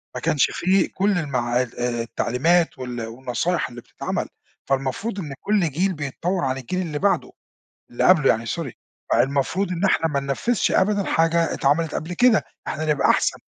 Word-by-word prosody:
ما -, -, -4 dB
كانش 155 Hz, -4 st, +2 dB
في 190 Hz, +2 st, +2 dB
كل 195 Hz, 0 st, 0 dB
المع 125 Hz, -6 st, 0 dB
ال 125 Hz, -1 st, -6 dB
آآ، 120 Hz, -1 st, -1 dB
التعليمات 160 Hz, +8 st, +1 dB
وال 125 Hz, -2 st, -5 dB
والنصايح 125 Hz, +9 st, -2 dB
اللي 120 Hz, -1 st, -10 dB
بتتعمل، -, -, -4 dB, 0.4 s
فالمفروض 135 Hz, -, -1 dB
إن 150 Hz, -7 st, -5 dB
كل 200 Hz, -6 st, +1 dB
جيل 185 Hz, +7 st, 0 dB
بيتطور 170 Hz, +5 st, -2 dB
عن 130 Hz, 0 st, -1 dB
الجيل 160 Hz, +9 st, -3 dB
اللي 155 Hz, -5 st, -3 dB
بعده 200 Hz, +3 st, +1 dB, 0.6 s
اللي 120 Hz, -, -1 dB
قبله 165 Hz, -7 st, +5 dB
يعني 115 Hz, +1 st, +2 dB
sorry، 105 Hz, -, -3 dB, 0.4 s
فالمفروض 140 Hz, +10 st, +1 dB
إن 180 Hz, +2 st, -2 dB
إحنا 175 Hz, -4 st, +3 dB
ما 140 Hz, -3 st, -1 dB
ننفذش 140 Hz, -, 0 dB
أبدًا 200 Hz, +1 st, +2 dB
حاجة 165 Hz, 0 st, +2 dB
اتعملت 155 Hz, +3 st, +1 dB
قبل 165 Hz, +3 st, -4 dB
كده، 245 Hz, +1 st, +4 dB, 0.2 s
إحنا 155 Hz, -, -3 dB
نبقى 150 Hz, -2 st, +3 dB
أحسن. -, -, +2 dB
155 Hz, 170 wpm, -23 LUFS, 130-180 Hz, 0.6 s, قبله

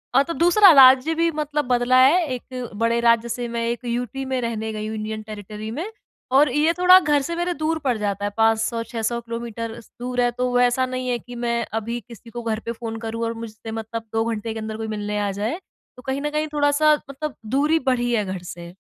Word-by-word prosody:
अ, 275 Hz, -, +6 dB
तो 335 Hz, -, -4 dB
दूसरा 355 Hz, +3 st, +6 dB
राज्य 265 Hz, +2 st, +7 dB
भी 335 Hz, +1 st, +2 dB
मतलब 300 Hz, -1 st, -2 dB
बदला 245 Hz, 0 st, +3 dB
है, 330 Hz, +7 st, +5 dB
एक 250 Hz, 0 st, -7 dB
बड़े 230 Hz, +2 st, +1 dB
राज्य 235 Hz, 0 st, +3 dB
से 240 Hz, +1 st, -3 dB
मैं 230 Hz, 0 st, -2 dB
एक 240 Hz, +2 st, -4 dB
यूटी 245 Hz, +2 st, -3 dB
में 260 Hz, -1 st, -1 dB
रहने 220 Hz, -2 st, -3 dB
गई 215 Hz, 0 st, -4 dB
हूँ 220 Hz, -, -4 dB
इंडियन 215 Hz, 0 st, -4 dB
टेरिटरी 215 Hz, 0 st, -8 dB
में 310 Hz, +9 st, -4 dB, 0.5 s
और 280 Hz, +1 st, +5 dB
ये 305 Hz, +5 st, +2 dB
थोड़ा 365 Hz, +1 st, +8 dB
घर 295 Hz, -4 st, +2 dB
से 335 Hz, +4 st, -4 dB
मेरे 350 Hz, +1 st, -1 dB
दूर 315 Hz, 0 st, -1 dB
पड़ 250 Hz, -4 st, +1 dB
जाता 205 Hz, -1 st, -2 dB
है 205 Hz, -, -2 dB
500 225 Hz, +1 st, +2 dB
600 230 Hz, 0 st, -2 dB
किलोमीटर 230 Hz, 0 st, -6 dB
स -, -, -22 dB
दूर 250 Hz, 0 st, -1 dB
है, 245 Hz, -, +3 dB
तो 250 Hz, +1 st, -2 dB
वैसा 245 Hz, +1 st, +3 dB
नहीं 255 Hz, 0 st, -4 dB
है 245 Hz, -, +1 dB
कि 245 Hz, +1 st, -11 dB
मैं 235 Hz, 0 st, -1 dB
अभी 230 Hz, +2 st, -2 dB
किसी 235 Hz, 0 st, -13 dB
को 240 Hz, +1 st, -6 dB
घर 220 Hz, -1 st, -1 dB
पे 230 Hz, -, -2 dB
फ़ोन 230 Hz, -1 st, -6 dB
करूँ 230 Hz, 0 st, -4 dB
और 230 Hz, -, -2 dB
मुझसे 225 Hz, -1 st, -8 dB
मतलब 225 Hz, 0 st, -5 dB
2 225 Hz, 0 st, +1 dB
घंटे 220 Hz, +1 st, -4 dB
के 220 Hz, -, -5 dB
अंदर 220 Hz, 0 st, -5 dB
कोई 220 Hz, 0 st, -4 dB
मिलने 210 Hz, -1 st, -3 dB
आ 205 Hz, -1 st, -1 dB
जाए। 220 Hz, -, -3 dB, 0.4 s
तो -, -, -11 dB
कहीं 265 Hz, +1 st, -1 dB
न 295 Hz, -, -1 dB
कहीं 305 Hz, +1 st, -1 dB
थोड़ा-सा 295 Hz, +1 st, +4 dB, 0.2 s
मतलब 275 Hz, -1 st, -5 dB
दूरी 290 Hz, +8 st, +2 dB
बढ़ी 245 Hz, -1 st, +1 dB
है 215 Hz, -3 st, +1 dB
घर 190 Hz, -1 st, -4 dB
से। 170 Hz, 0 st, -9 dB
235 Hz, 230 wpm, -22 LUFS, 225-270 Hz, 0.5 s, थोड़ा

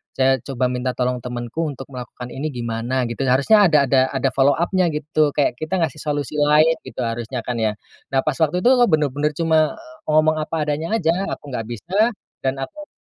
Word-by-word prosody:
"saya 130 Hz, -1 st, +3 dB
coba 125 Hz, 0 st, -2 dB
minta 125 Hz, 0 st, -2 dB
tolong 125 Hz, 0 st, -1 dB
temanku 120 Hz, +6 st, -4 dB
untuk 135 Hz, -2 st, -7 dB
melakukan 125 Hz, -1 st, -8 dB
ini, 145 Hz, +4 st, -3 dB
gimana?" 120 Hz, +2 st, -2 dB
gitu. 120 Hz, -, -5 dB
Harusnya 180 Hz, +11 st, +5 dB
ada 150 Hz, -3 st, +4 dB
ada 130 Hz, -1 st, +5 dB
ada 135 Hz, -1 st, 0 dB
follow 140 Hz, +2 st, +3 dB
up-nya, 175 Hz, +3 st, +1 dB
gitu. 150 Hz, -1 st, 0 dB
Kayak 140 Hz, -4 st, +1 dB
kita 155 Hz, +4 st, -2 dB
ngasih 155 Hz, -1 st, -3 dB
solusi 145 Hz, -1 st, -2 dB
lain, 150 Hz, +2 st, +4 dB
gitu -, -, -6 dB
harusnya 115 Hz, 0 st, -3 dB
kan 120 Hz, -2 st, -3 dB
ya? 110 Hz, -1 st, 0 dB, 0.4 s
Nah, 135 Hz, -, +2 dB
pas 150 Hz, -3 st, 0 dB
waktu 165 Hz, +3 st, +1 dB
itu, 245 Hz, -, +5 dB
aku 245 Hz, -2 st, +5 dB
benar-benar 150 Hz, -1 st, +1 dB
cuma 160 Hz, -2 st, +2 dB, 0.3 s
ngomong 155 Hz, +1 st, +3 dB
apa 155 Hz, 0 st, -2 dB
adanya 150 Hz, +8 st, -1 dB
aja. 165 Hz, -7 st, +2 dB, 0.2 s
Aku 145 Hz, -, -12 dB
nggak 115 Hz, -3 st, -4 dB
bisa, 140 Hz, -, -7 dB, 0.5 s
dan 130 Hz, -, +1 dB
aku 300 Hz, -, -7 dB
145 Hz, 195 wpm, -21 LUFS, 125-155 Hz, 0.5 s, Harusnya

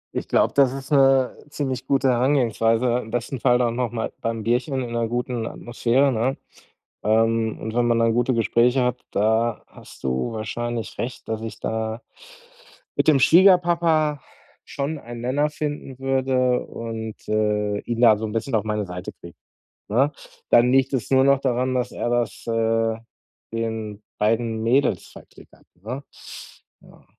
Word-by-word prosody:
Ich -, -, -3 dB
glaube, -, -, +2 dB
das 135 Hz, -3 st, +4 dB
ist 135 Hz, +1 st, -8 dB
'ne 135 Hz, -2 st, +4 dB
ziemlich 130 Hz, -4 st, -4 dB
gute 135 Hz, -1 st, +2 dB
Herangehensweise, 120 Hz, -2 st, +2 dB
im 110 Hz, -, -8 dB
besten 120 Hz, +3 st, -3 dB
Fall 120 Hz, +2 st, +3 dB
dann 120 Hz, -2 st, 0 dB
noch 125 Hz, -1 st, -1 dB
mal 115 Hz, -2 st, -4 dB
beim 115 Hz, -1 st, -3 dB
Bierchen 125 Hz, +5 st, 0 dB
in 120 Hz, -, -6 dB
'ner 115 Hz, -1 st, -1 dB
guten 120 Hz, -1 st, -2 dB
Atmosphäre, 125 Hz, +3 st, 0 dB
ne? 125 Hz, +4 st, 0 dB, 0.7 s
Ähm, 110 Hz, +1 st, +1 dB
und 110 Hz, +1 st, -6 dB
wenn 120 Hz, 0 st, +2 dB
man 115 Hz, -1 st, +2 dB
dann 115 Hz, 0 st, +3 dB
gute 120 Hz, +2 st, +1 dB
Gespräche 120 Hz, +3 st, +2 dB
hat, 125 Hz, 0 st, -1 dB
da 110 Hz, +2 st, +1 dB
hast -, -, -16 dB
du 65 Hz, -, -1 dB
wahrscheinlich 115 Hz, +1 st, -4 dB
recht, 125 Hz, +2 st, -5 dB
dass 110 Hz, -1 st, -3 dB
ich 115 Hz, 0 st, -7 dB
da 110 Hz, +1 st, -3 dB, 0.9 s
mit -, -, +1 dB
dem 150 Hz, -3 st, +6 dB
Schwiegerpapa 170 Hz, -2 st, +4 dB, 0.5 s
schon 145 Hz, +3 st, -3 dB
einen 120 Hz, -2 st, -9 dB
Nenner 140 Hz, +5 st, +1 dB
finden 145 Hz, -3 st, -5 dB
würde 130 Hz, -1 st, +1 dB
und, 110 Hz, -1 st, -6 dB
äh, 105 Hz, -1 st, 0 dB
ihn 120 Hz, 0 st, -2 dB
da 110 Hz, -3 st, +6 dB
so 110 Hz, -, -3 dB
'n 105 Hz, -, -6 dB
bisschen 115 Hz, +3 st, -3 dB
auf 110 Hz, -2 st, +1 dB
meine 105 Hz, -1 st, -1 dB
Seite 90 Hz, -1 st, -7 dB
kriege, 85 Hz, -1 st, -13 dB, 0.5 s
ne? 135 Hz, +8 st, +2 dB, 0.4 s
Dann 120 Hz, +1 st, +5 dB
liegt 135 Hz, +1 st, +3 dB
es 130 Hz, 0 st, -2 dB
nur 130 Hz, 0 st, +5 dB
noch 140 Hz, -1 st, +4 dB
daran, 130 Hz, 0 st, 0 dB
dass 125 Hz, 0 st, -1 dB
er -, -, -3 dB
das, 120 Hz, -1 st, -2 dB
äh, 115 Hz, 0 st, +1 dB, 0.6 s
den 110 Hz, -2 st, -4 dB, 0.2 s
beiden 110 Hz, +1 st, 0 dB
Mädels 130 Hz, +5 st, +1 dB
verklickert, -, -, -17 dB
ne? 115 Hz, +10 st, -7 dB, 0.8 s
Ja. -, -, -19 dB
120 Hz, 160 wpm, -23 LUFS, 110-130 Hz, 0.9 s, dem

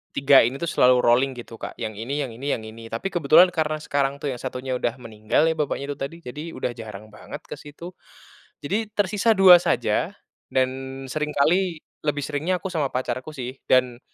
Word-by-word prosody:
3 140 Hz, 0 st, +6 dB
ini 130 Hz, -, -4 dB
tuh 170 Hz, +4 st, -4 dB
selalu 125 Hz, 0 st, +4 dB
rolling 130 Hz, +2 st, +3 dB
gitu 115 Hz, -2 st, -10 dB
Kak -, -, -7 dB
yang 110 Hz, -, -4 dB
ini 140 Hz, +5 st, -2 dB
yang 125 Hz, -, -6 dB
ini 130 Hz, +5 st, -7 dB
yang 110 Hz, -, -8 dB
ini. 115 Hz, +1 st, -10 dB
Tapi 115 Hz, +13 st, -4 dB
kebetulan 175 Hz, +2 st, +5 dB
karena 155 Hz, -3 st, -1 dB
sekarang 140 Hz, -1 st, 0 dB
tuh 140 Hz, -1 st, -4 dB
yang 125 Hz, -, -6 dB
satunya 130 Hz, 0 st, -4 dB
udah 120 Hz, 0 st, -1 dB
meninggal 110 Hz, +2 st, -1 dB
ya, 160 Hz, 0 st, +2 dB
bapaknya 145 Hz, -1 st, -2 dB
itu 140 Hz, -, -6 dB
tadi 140 Hz, +4 st, -4 dB
jadi, 145 Hz, +5 st, -7 dB
udah 125 Hz, -, -2 dB
jarang 110 Hz, -2 st, -10 dB
banget -, -, -10 dB
ke -, -, -9 dB
situ. 160 Hz, +5 st, -10 dB, 0.7 s
Jadi, 210 Hz, +9 st, -1 dB
tersisa 205 Hz, +3 st, +2 dB
2 185 Hz, -2 st, +9 dB
saja -, -, 0 dB, 0.4 s
dan 130 Hz, -1 st, +2 dB, 0.4 s
seringkali, 155 Hz, +3 st, 0 dB, 0.2 s
lebih 145 Hz, -1 st, 0 dB
seringnya 155 Hz, +6 st, -1 dB
aku 190 Hz, -, -2 dB
sama 155 Hz, -5 st, 0 dB
pacarku 130 Hz, +3 st, -3 dB
sih 130 Hz, +1 st, -6 dB
dan, 125 Hz, -1 st, +2 dB
140 Hz, 190 wpm, -24 LUFS, 125-155 Hz, 0.7 s, 2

